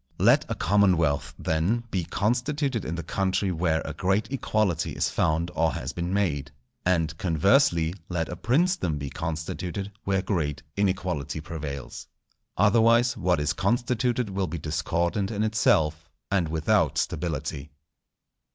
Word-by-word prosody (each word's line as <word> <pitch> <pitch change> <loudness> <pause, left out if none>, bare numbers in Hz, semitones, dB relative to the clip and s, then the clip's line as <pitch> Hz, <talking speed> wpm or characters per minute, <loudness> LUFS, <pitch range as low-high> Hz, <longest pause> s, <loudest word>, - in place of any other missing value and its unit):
Let - - +4
a - - -1
commonwealth, 80 -8 +2
then, 90 +10 0
be 90 -3 -1
constituted 125 - -1
in 80 - -3
the 85 - -4
country 95 +3 0
where 80 -2 0
a 80 - -4
great 95 - 0
equality 105 - 0
is - - 0
found 80 +2 +1
or 80 -1 +1
has - - -4
been 85 +1 -3
made; 75 -8 0 0.3
and, 85 -3 +1
conversely, 85 - +3 0.2
let 85 -3 -1
a 90 - -5
princedom 135 - +1
be 70 -1 -5
constituted 80 +5 -4
where 95 -1 0
great 80 -7 -2
inequality 90 -7 -1
prevails. 75 -4 -6 0.5
Otherwise 115 +4 +4
what 90 -5 +1
is 75 +3 0
constituted 120 +3 0
will 95 -1 -1
be 85 +1 -4
discordant 85 +5 -1
in 105 -1 -1
itself, 80 -8 +2 0.2
and 95 -4 +2
without 80 -1 +1
stability. 75 -2 -2
90 Hz, 135 wpm, -26 LUFS, 80-105 Hz, 0.5 s, Let